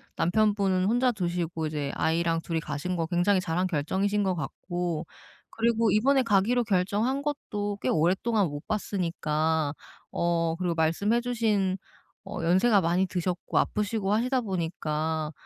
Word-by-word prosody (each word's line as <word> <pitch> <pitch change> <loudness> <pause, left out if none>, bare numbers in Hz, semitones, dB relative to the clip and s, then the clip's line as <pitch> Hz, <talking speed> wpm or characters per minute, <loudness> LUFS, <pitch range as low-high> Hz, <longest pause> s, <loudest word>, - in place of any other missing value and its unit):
남편분은 195 -1 +2
혼자 245 +4 +3
두시고 175 -5 -2
이제 145 -2 -3
아이랑 165 0 +1
2 165 0 -3
이 - - +1
가신 160 +4 -3
거 165 - -1
굉장히 180 +3 +2
잘한 180 +1 -1
결정이신 195 +6 0
것 185 -2 0
같고 175 +1 -3 0.4
그리고 230 -1 +1
이번에 265 +7 +4
가기로 230 +3 +2
결정한 205 +8 +1
것도 210 -9 -3
꽤 - - 0
오랫동안 190 +6 +2
못 145 -1 -7
봤으니까. 160 -6 -1 0.4
어 170 -1 +1
그리고 180 -2 -1
말씀해 200 +9 +1
주신 215 -6 0 0.5
어 165 - -5
"연세가 190 +4 +4
많이 175 +3 +1
드셨고 180 -1 -2
아프시고 210 -1 0
하시다 250 +4 +1
보니까 160 -5 -2
185 Hz, 320 characters per minute, -27 LUFS, 165-210 Hz, 0.5 s, 이번에